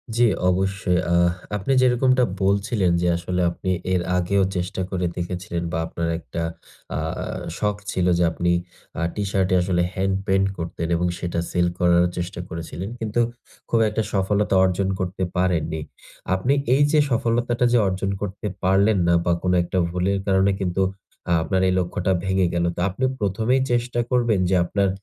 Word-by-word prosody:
জ্বি 120 +1 +5 0.2
অবশ্যই, 95 -1 +1
আহ 85 0 +4 0.3
আপনি 105 +7 -2
যেরকমটা 130 0 +3 0.2
বলছিলেন 100 -1 +1
যে 90 - +1
আসলে 90 +1 -2
আপনি 95 - -5 0.2
এর 90 - +2 0.2
আগেও 95 +2 +2
চেষ্টা 90 +1 -2
করে 90 -2 -1
দেখেছিলেন 85 -1 -4
বা 85 - -1
আপনার 85 0 -3
একটা 85 +1 -6 0.6
আ - - -1 0.2
আ - - -4 0.3
শখ 105 -1 0
ছিল 90 - 0
যে 90 - +3
আপনি 85 +1 0 0.5
আ - - +1
টি-শার্ট 100 -2 0
এ - - +5
আসলে 90 -1 +1
হ্যান্ড 95 0 0
পেইন্ট 95 0 +3
করতেন 85 0 -4
এবং 90 +1 +1
সেটা 85 -1 -2
সেল 90 -1 +2
করারও 85 0 +4
চেষ্টা 90 0 -4
করেছিলেন। 85 +2 -6
কিন্তু, 110 +1 0 0.5
খুব 115 - +2
একটা 105 +1 -1
সফলতা 100 +1 +1
অর্জন 95 +1 +1
করতে 95 0 -2
পারেননি। 80 -3 0 0.5
আপনি 110 +9 +1 0.2
এই 145 - +4
যে 155 - +4
সফলতাটা 120 +1 +1
যে - - +6
অর্জন 95 +1 -1
করতে 105 +1 -4 0.2
পারলেন 100 +3 +3
না, 85 - +4
বা 85 - +2
কোনো 90 -1 +2
একটা 85 - -3
ভুলের 90 +3 0
কারণে 95 0 +3
কিন্তু 95 -1 -1 0.6
আপনার 95 +4 0
এই 95 - +2
লক্ষ্যটা 90 +1 -1
ভেঙে 95 -1 +2
গেলো। 85 0 +1
তো - - -7
আপনি 100 +8 -5 0.2
১ম 105 +1 -1
এই 135 - +2
চেষ্টা 120 0 0
করবেন 120 -5 +2
যে 95 - +3
আপনার 100 +2 +1
95 Hz, 170 wpm, -23 LUFS, 90-105 Hz, 0.6 s, যে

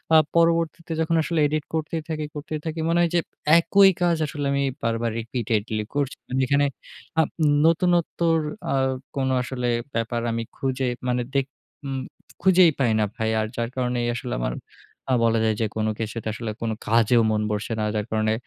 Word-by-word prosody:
আ - - +10 0.2
পরবর্তীতে 165 0 +2
যখন 165 +1 +1
আসলে 165 0 -1
edit 155 0 -1
করতেই 160 +1 -2
থাকি 155 -1 -2
করতেই 155 +1 -4
থাকি, 160 0 -3
মনে 170 +1 +3
হয় 170 - +3
যে - - +5 0.4
একই 195 +3 +6
কাজ 175 -2 +3
আসলে 145 -1 -4
আমি 140 0 +1 0.2
বারবার 115 0 0
repeatedly 110 -2 -2
করছি। 140 -2 0
মানে 130 +1 0
এখানে 140 +1 +3 0.6
আপ - - 0 0.4
নতুনত্বর 170 -1 +2 0.4
আ - - +2 0.4
কোনো 130 -1 0
আসলে 125 0 -3 0.3
ব্যাপার 115 +1 -1
আমি 115 0 -2
খুঁজে 130 -1 -1 0.2
মানে 125 0 +1
দেখ 135 - +3 0.5
ম 130 - -2 0.4
খুঁজেই 185 -3 +6
পাই 120 -4 +3
না 105 - +3
ভাই। 110 -2 -1
আর 110 - 0
যার 115 0 -2
কারণেই 125 -2 0
আসলে 125 +1 -4
আমার - - -1 0.6
আ - - +4
বলা 115 0 +3
যায় 110 -1 +2
যে - - +2
কোনো 110 0 0
কিছুতে 110 0 -4
আসলে 110 0 -4
কোনো 115 -1 -1
কাজেও 115 +1 +4
মন 105 0 +1
বসছে 105 +2 -2
না। - - 0
যার 105 -1 -1
কারণে 110 0 +1
130 Hz, 180 wpm, -24 LUFS, 115-160 Hz, 0.6 s, আ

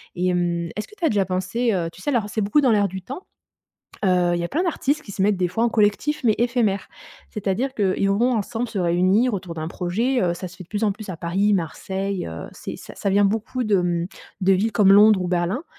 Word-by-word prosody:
et 180 0 0
hem, 175 -1 0
est-ce 210 - -4
que 425 - -17
tu 380 - -12
as - - +4
déjà 200 -2 +1
pensé, 185 +6 -1
heu, 170 -3 -1
tu 185 - -15
sais, - - -2
alors 230 -7 0
c'est 215 - -2
beaucoup 210 +9 +3
dans 260 - +3
l'air 205 -2 +3
du 190 +1 -7
temps. 265 - -8 0.8
Heu, 180 -2 +3
il - - -1
y - - -2
a - - -3
plein 325 - 0
d'artistes 305 -4 -1
qui 205 - -11
se - - -6
mettent 200 0 +3
des 180 -1 0
fois 225 +6 0
en - - +3
collectif, 220 +7 +1
mais 220 - +4
éphémères, 235 -4 0 0.4
c'est-à-dire 215 +6 -2
qu'ils 195 -2 +1
vont 235 +6 +2
ensemble 225 +2 -2
se 225 - -4
réunir 185 +7 +2
autour 185 -3 -5
d'un 160 -1 -4
projet. 220 +10 -1
Heu, 175 -2 +1
ça 180 +2 -6
se 175 - -15
fait 185 - -9
de - - -28
plus 210 +1 -2
en 205 - +2
plus 210 -1 -9
à 180 - -5
Paris, 190 +5 +1
Marseille, 190 +2 -2
heu, 80 0 -7
c'est - - -7
ça - - -12
ça 200 - -2
vient 200 +1 +4
beaucoup 225 +5 -2
de, 210 -2 +3
mmh, 175 -1 -1 0.4
de 190 +1 +4
villes 205 +4 +1
comme 200 -3 +5
Londres 210 0 +7
ou 180 - -1
Berlin 180 - -1
200 Hz, 255 wpm, -22 LUFS, 180-225 Hz, 0.8 s, Londres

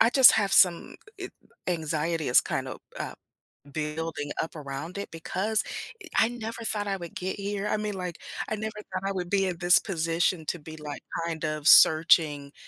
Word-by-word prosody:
I - - +6
just 265 0 +8
have 200 -3 +1
some 175 -3 +4 0.2
g 380 - -5
it - - -16 0.3
anxiety 160 -2 -1
is 125 - +6
kinda, - - -4 0.2
uh, - - -5 0.6
building 150 -1 -4
up 160 - -6
around 150 +5 -6
it 200 - -6
because 200 +6 -1 0.4
e - - -10
I 225 - +5
never 230 -1 -6
thought 210 -2 -1
I 195 -1 -1
would 170 -3 -9
get 185 +1 -4
here, 200 0 -3
I 210 - +1
mean, 210 -1 -3
like, 180 -3 -5 0.3
I 215 - -2
never 215 0 -5 0.2
thought 185 +1 -2
I - - -1
would 180 -2 -4
be 195 -1 +2
in 180 -2 -2
this 175 +1 +5
position 165 -2 -1
to 175 - -2
be, 160 0 -10
like, 150 -2 -7 0.3
kind 165 -1 -4
of 155 -1 -3
searching 155 -4 +6
175 Hz, 195 wpm, -27 LUFS, 160-200 Hz, 0.6 s, just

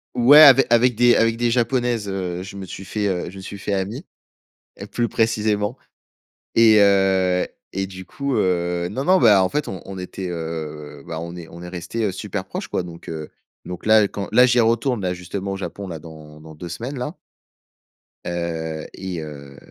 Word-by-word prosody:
Ouais, 125 +5 +8
ave 135 -3 +9
avec 120 0 +4
des 120 +1 +5
avec 115 0 +2
des 120 0 +1
Japonaises, 120 -3 0
heu, 90 -2 -3
je 95 +1 -9
me 95 - -6
suis 95 - -8
fait, 105 +1 -2
heu, 90 -3 -2
je 95 - -12
me - - -8
suis 100 +1 -8
fait 100 - -3
ami, 105 - -3 0.8
heu, - - -6
plus 120 -1 -1
précisément 110 0 0 0.8
et 115 -1 +6
heu 95 -2 +3 0.3
et 95 +1 -1
du 95 -1 -10
coup, 140 +5 -4
heu 90 -2 0
non, 130 +8 -3
non, 185 +4 +4
bah, 105 -5 +6
en 95 - +1
fait, 150 0 -2
on 95 - -6
on 95 -1 -8
était, 90 0 -6
heu, 75 -3 -6
bah, 80 - -5
on 85 +1 -7
est 85 -2 -9
on 85 +1 -11
est 90 - -8
restés, 90 +6 -4
heu, 100 - 0
super 100 -1 -5
proches, - - -6
quoi 90 - -1
donc 85 -1 -10
heu, 80 -2 -6 0.4
donc 90 +2 -7
là, 110 -1 +5
quand 100 0 -6
là, 125 +3 +7
j'y 120 -1 +4
retourne, 115 +1 +1
là, 90 -1 -1
justement 90 +2 -5
au 95 - -3
Japon, 100 +1 -6
là, 80 -2 -6
dans 75 -1 -12
dans 80 0 -13
2 85 +3 -8
semaines, 120 - -5
là. 125 +5 -4 1.1
Heu 80 -2 -4
et 95 -3 -5
heu, 70 -2 -10
95 Hz, 205 wpm, -22 LUFS, 85-115 Hz, 1.1 s, ave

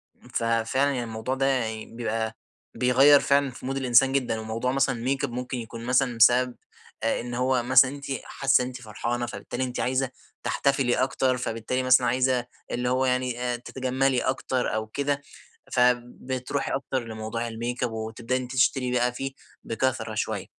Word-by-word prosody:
امم، - - -20
ففعلًا 115 +5 +1
يعني 125 -3 -2
الموضوع 115 +3 -3
ده 135 - 0
يعني 115 -5 0
بيبقى 115 -1 -3 0.4
بيغيّر 135 +3 +6
فعلًا، 140 -1 +2
في 125 - -11
مود 135 +1 -2
الإنسان 130 0 +4
جدًا 125 -5 0
وموضوع 110 +3 -2
مثلًا 135 -1 +1
الmakeup 135 0 0
ممكن 125 +1 -4
يكون 115 0 -7
مثلًا 125 -1 +2
بسبب 125 +2 +5 0.5
آآ، 115 - +1
إن 120 0 -6
هو 125 0 +1
مثلًا 130 +1 +6
أنتِ 140 0 -8 0.2
حاسة 135 -2 +2
إن 125 - -2
أنتِ 130 0 -8
فرحانة 120 +2 -3
فبالتالي 120 +2 -5
أنتِ 125 -1 -4
عايزة 130 +1 0 0.3
تحتفِلي 135 -3 +1
أكتر، 130 0 +1
فبالتالي 120 +2 -2
مثلًا 130 0 +5
عايزة 125 -1 +2 0.3
اللي 125 0 -1
هو 130 +1 +2
يعني 125 -1 0
آآ 125 -1 0
تتجمِلّي 130 +1 0
أكتر 130 -2 -1
أو 110 0 -2
كده، 140 +4 -1 0.5
فبتروحي 125 +2 0
أكتر 135 -2 -2
لموضوع 110 +1 -4
الmakeup 120 +2 -3
وتبدأي 115 +3 -3
إن - - -2
أنتِ 125 +1 -7
تشتري 130 -1 +2
بقى 125 0 +1
فيه 135 +2 -4 0.3
بكثرة 130 +3 -1
شوية. - - -2
125 Hz, 165 wpm, -26 LUFS, 120-130 Hz, 0.5 s, بيغيّر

